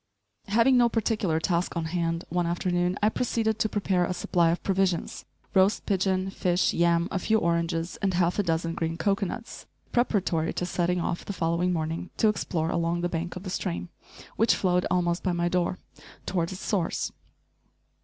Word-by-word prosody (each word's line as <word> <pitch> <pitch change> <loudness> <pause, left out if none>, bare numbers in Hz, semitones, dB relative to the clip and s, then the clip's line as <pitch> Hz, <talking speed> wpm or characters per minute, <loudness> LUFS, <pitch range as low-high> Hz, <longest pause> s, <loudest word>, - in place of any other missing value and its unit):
Having 235 +5 +4
no 240 -1 +5
particular 215 -8 0
task 170 +1 0
on 165 - -1
hand, 165 0 -1
one 175 0 0
afternoon 175 +1 0
I 215 - +5
proceeded 220 -2 0
to 220 - +1
prepare 195 -4 +1
a 180 +1 -1
supply 175 -1 +2
of 170 - -1
provisions, 190 -3 0 0.3
roast 195 +2 +3
pigeon, 190 -1 0
fish, 180 -1 +1
yam, 170 0 +2
a 195 - 0
few 220 +4 +2
oranges 170 -2 -1
and 190 -2 +1
half 175 +2 +1
a - - +6
dozen 165 -2 -1
green 165 0 -2
cocoanuts, 200 +5 -2 0.2
preparatory 190 -9 +1
to 180 - -2
setting 180 0 0
off, 175 0 -2
the 200 - -5
following 170 0 0
morning, 165 +1 -2
to 220 - +4
explore 165 -6 -1
along 170 +1 0
the 175 - 0
bank 170 +1 -3
of 185 - -7
the 185 - -5
stream, 85 - -3 0.5
which 225 +1 +4
flowed 180 -1 +1
almost 175 -1 +1
by 180 - 0
my 175 0 0
door, 180 +1 0 0.5
toward 170 -2 -1
its 190 - -7
source. 190 -6 -1
180 Hz, 175 wpm, -27 LUFS, 170-195 Hz, 0.5 s, a